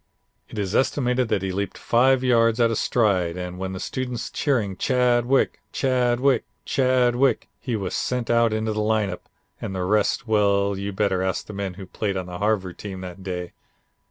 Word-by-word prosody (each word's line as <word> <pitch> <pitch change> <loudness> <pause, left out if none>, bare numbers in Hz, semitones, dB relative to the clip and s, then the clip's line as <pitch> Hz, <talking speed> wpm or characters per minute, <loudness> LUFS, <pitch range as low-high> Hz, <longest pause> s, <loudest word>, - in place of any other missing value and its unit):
It - - -9
is 100 -2 -2
estimated 125 -2 +1
that 95 - 0
he 95 - -1
leaped 100 0 -3
five 130 +2 +3
yards 115 -2 +3
at 115 -1 +4
a - - 0
stride, 95 -8 +1
and 90 0 -5
with 95 0 -3
the 95 - -5
students 125 +1 -4
cheering, 115 -10 0
'Chadwick, 125 +3 +2
Chadwick, 125 -1 +2 0.2
Chadwick,' 130 -1 +2
he 125 -3 -3
was 100 -4 -3
sent 125 -2 -1
out 115 -1 +4
into 110 0 -1
the 105 - -1
lineup 105 -4 -1 0.3
and 95 - -4
the 90 - -1
rest, 105 +4 +1
well, 100 -2 +2
you'd 100 0 -4
better 95 -2 +1
ask 95 0 -1
the 105 - -9
men 100 -2 -4
who 95 0 -8
played 100 +1 -3
on 95 - -3
the 90 0 -7
Harvard 100 -4 -1
team 95 -2 -6
that 90 +1 -8
day. 90 -2 -5
105 Hz, 185 wpm, -24 LUFS, 95-120 Hz, 0.3 s, at